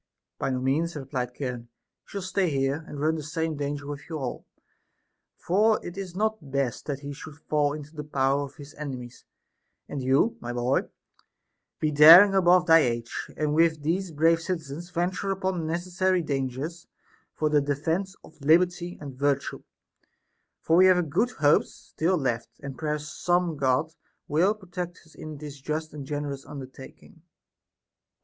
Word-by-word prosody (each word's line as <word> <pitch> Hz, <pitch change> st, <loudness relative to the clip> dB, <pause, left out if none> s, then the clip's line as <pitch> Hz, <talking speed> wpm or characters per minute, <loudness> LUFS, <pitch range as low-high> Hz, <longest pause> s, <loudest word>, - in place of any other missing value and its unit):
By -, -, -1 dB
no 130 Hz, -1 st, -1 dB
means, 150 Hz, +6 st, 0 dB
re 140 Hz, -3 st, -6 dB
plied 125 Hz, -2 st, -3 dB
Charon, 125 Hz, -4 st, -4 dB
he 115 Hz, -, -54 dB
shall 200 Hz, -2 st, -5 dB
stay 185 Hz, -1 st, 0 dB
here, 140 Hz, +2 st, 0 dB
and 145 Hz, -, -7 dB
run 155 Hz, +2 st, +2 dB
the 160 Hz, -, -3 dB
same 160 Hz, +2 st, -2 dB
danger 145 Hz, 0 st, -3 dB
with 145 Hz, +1 st, -7 dB
you 160 Hz, -, -3 dB
all, 130 Hz, -4 st, -5 dB, 0.9 s
for 210 Hz, +5 st, +2 dB
it 175 Hz, -, -6 dB
is 190 Hz, -3 st, -6 dB
not 215 Hz, -7 st, -1 dB
best 135 Hz, -3 st, -2 dB
that 140 Hz, -2 st, -3 dB
he 145 Hz, 0 st, -6 dB
should 150 Hz, +2 st, -10 dB
fall 150 Hz, -2 st, 0 dB
into 150 Hz, +1 st, -9 dB
the 150 Hz, -, -5 dB
power 140 Hz, -1 st, +1 dB
of 140 Hz, -, -13 dB
his 145 Hz, -1 st, -12 dB
enemies; 125 Hz, -5 st, -7 dB, 0.6 s
and 140 Hz, -, -5 dB
you, 135 Hz, -, +2 dB
my 120 Hz, 0 st, -5 dB
boy, 120 Hz, +2 st, 0 dB, 0.9 s
be 155 Hz, -, +1 dB
daring 165 Hz, +7 st, +9 dB
above 180 Hz, -1 st, +5 dB
thy 165 Hz, -1 st, +7 dB
age, 120 Hz, -5 st, -2 dB
and 150 Hz, -1 st, 0 dB
with 160 Hz, -1 st, +3 dB
these 180 Hz, +5 st, 0 dB
brave 165 Hz, +2 st, +3 dB
citizens 165 Hz, -1 st, -5 dB
venture 180 Hz, +3 st, -2 dB
upon 185 Hz, -4 st, -1 dB
neces 175 Hz, +3 st, -3 dB
sary 185 Hz, 0 st, +2 dB
clangers 140 Hz, +4 st, -3 dB, 0.5 s
for 155 Hz, -, 0 dB
the 150 Hz, -1 st, +4 dB
defence 160 Hz, +7 st, -1 dB
of 160 Hz, -, -17 dB
liberty 175 Hz, +3 st, +2 dB
and 135 Hz, -3 st, -9 dB
virtue; 140 Hz, -1 st, 0 dB, 1.0 s
for 165 Hz, -, +3 dB
we 185 Hz, +1 st, +7 dB
have 180 Hz, -5 st, +3 dB
good 215 Hz, +10 st, +2 dB
hopes 150 Hz, -10 st, +2 dB
still 180 Hz, +3 st, -1 dB
left, 120 Hz, -6 st, -1 dB
and 140 Hz, -1 st, -6 dB
perhaps 150 Hz, 0 st, -3 dB
some 175 Hz, +1 st, 0 dB
God 140 Hz, +3 st, +1 dB, 0.3 s
will 175 Hz, +8 st, +2 dB
pro 200 Hz, -3 st, -17 dB
tect 175 Hz, -1 st, -6 dB
us 160 Hz, -, -20 dB
in 155 Hz, -1 st, -8 dB
this 145 Hz, -1 st, -9 dB
just 155 Hz, +2 st, -3 dB
and 140 Hz, -3 st, -7 dB
generous 145 Hz, -2 st, -4 dB
undertaking. 135 Hz, +3 st, -11 dB
155 Hz, 170 wpm, -26 LUFS, 140-175 Hz, 1.0 s, daring